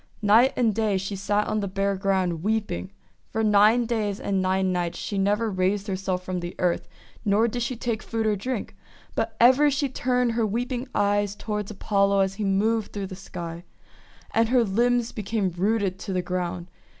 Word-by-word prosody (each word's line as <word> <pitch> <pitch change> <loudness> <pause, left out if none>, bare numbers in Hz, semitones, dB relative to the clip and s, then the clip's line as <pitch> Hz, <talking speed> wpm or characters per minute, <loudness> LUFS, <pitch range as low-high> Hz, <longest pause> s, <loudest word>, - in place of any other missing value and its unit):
Night 225 +6 +6
and 230 -4 +2
day 215 -2 +1
she 195 +2 -4
sat 205 +2 0
on 215 - -1
the 200 - -2
bare 195 +1 0
ground 190 -4 0
weep 215 +1 0
ing. 185 +2 -4 0.4
For 220 - -1
nine 215 +3 +5
days 215 -4 -1
and 195 -1 0
nine 185 0 +1
nights 175 -1 -2
she 200 - -3
never 210 +3 +1
raised 190 +2 0
herself 185 -2 -2
from 185 -1 -3
the 175 0 -6
earth, 180 -2 0 0.4
nor 215 +2 +3
did 240 +2 -3
she 235 +2 -2
take 230 -1 -2
food 225 -1 -2
or 215 -1 +2
drink; 240 +3 -4 0.4
but - - -2
ever 260 +5 +6
she 280 0 0
turned 250 -1 +1
her 230 0 0
weeping 245 +4 -2
eyes 205 0 +1
toward 210 -1 -4
Apollo 200 -1 +2
as 190 0 +1
he 210 +2 -4
moved 210 +3 +1
through 200 -1 -3
the 185 0 -7
sky. 170 -3 -7 0.7
And 225 0 +2
her 250 -1 +4
limbs 235 +3 +1
became 210 -2 -2
rooted 195 +1 0
to 195 - -5
the 180 -1 0
ground. 180 -1 -3
205 Hz, 190 wpm, -25 LUFS, 190-225 Hz, 0.7 s, Night